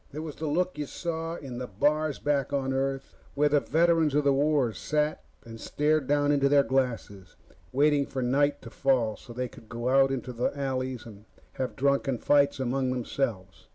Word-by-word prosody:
It 145 - -10
was 155 -2 -7
the 160 - -3
look 175 +2 -1
you 145 - -3
saw 165 0 -4
in 130 -6 -7
the 125 - -5
bars 150 +8 0
back 140 -2 -1
on 135 -1 -1
Earth, 135 0 -2 0.2
where 150 +1 +3
the 145 0 +4
veterans 165 -2 +2
of 150 - +3
the 140 -1 +3
war 140 -4 +2
sat 150 +4 -1 0.2
and 115 -1 -10
stared 150 -1 0
down 145 0 +2
into 140 -1 +3
their 140 0 +5
glasses, 120 -8 -2 0.4
waiting 145 +1 +2
for 130 -2 -3
night 140 +3 +1
to 115 - -10
fall 125 -6 +1
so 125 - -14
they 125 +2 -3
could 115 -2 -16
go 120 +1 -3
out 135 +1 +5
into 130 -1 -4
the 120 +4 -2
alleys 130 -3 -3
and 105 -2 -13 0.3
have 130 -1 -4
drunken 140 -1 +1
fights 140 +2 +2
among 130 0 0
themselves. 120 -6 -3
135 Hz, 190 wpm, -27 LUFS, 125-145 Hz, 0.4 s, their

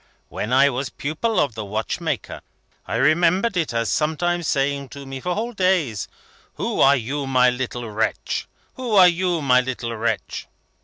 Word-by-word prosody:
When 105 - -4
I 135 +2 +6
was 130 +2 -3
pupil 160 +10 -2
of 140 -5 +1
the 110 -1 -5
watchmaker, 105 +2 -3 0.5
I - - -3
remembered 170 - +3
it 165 -4 0
as 115 -3 -1
sometimes 170 +2 0
saying 140 0 0
to 140 -1 -9
me 135 0 -6
for 180 +6 -2
whole 235 +3 -3
days, 180 - +1 0.5
'Who - - -2
are 140 +1 +7
you, 135 +3 -3
my 125 -1 +4
little 125 -1 -4
wretch? 110 +1 -2 0.3
Who 250 -4 -3
are 185 -2 +9
you, 175 -2 0
my 125 -2 +5
little 120 -2 -4
wretch?' 115 +1 -3
140 Hz, 165 wpm, -22 LUFS, 125-175 Hz, 0.5 s, are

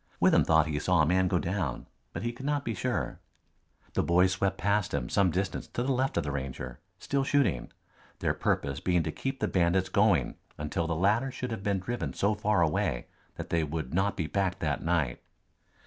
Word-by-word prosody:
Withem - - +5
thought 80 -1 +4
he 75 -2 -2
saw 85 0 +3
a - - +4
man 90 +3 +3
go 90 - +2
down, 85 -7 -2 0.3
but - - -5
he 120 - -1
could 130 +4 -7
not 145 -1 0
be 115 - -1
sure. 95 - -2 0.7
The - - +2
boys 90 +2 +4
swept 95 +1 0
past 100 -5 +1
him 65 -3 -2
some 100 -2 +3
distance 95 +3 -2
to 120 - -3
the 135 - 0
left 130 -3 0
of 85 - +2
the 70 - -3
Ranger, 65 -2 -5 0.2
still 140 -1 -1
shooting, 125 - +1 0.5
their - - 0
purpose 70 -1 -1
being 90 0 +1
to 80 - -2
keep 135 - -4
the - - +1
bandits 90 +1 +2
going - - +2 0.2
until 75 +3 -2
the 85 - -1
latter 105 +10 +2
should 125 -1 -5
have 110 -3 -4
been 100 -1 0
driven 120 +6 -3
so 100 +2 +1
far 105 -3 +2
away 75 -6 0 0.3
that - - -7
they 85 -1 +2
would 75 -2 -4
not 95 +3 +1
be 85 - -1
back 95 +4 0
that - - -1
night. 80 -7 0
90 Hz, 210 wpm, -29 LUFS, 80-105 Hz, 0.7 s, Withem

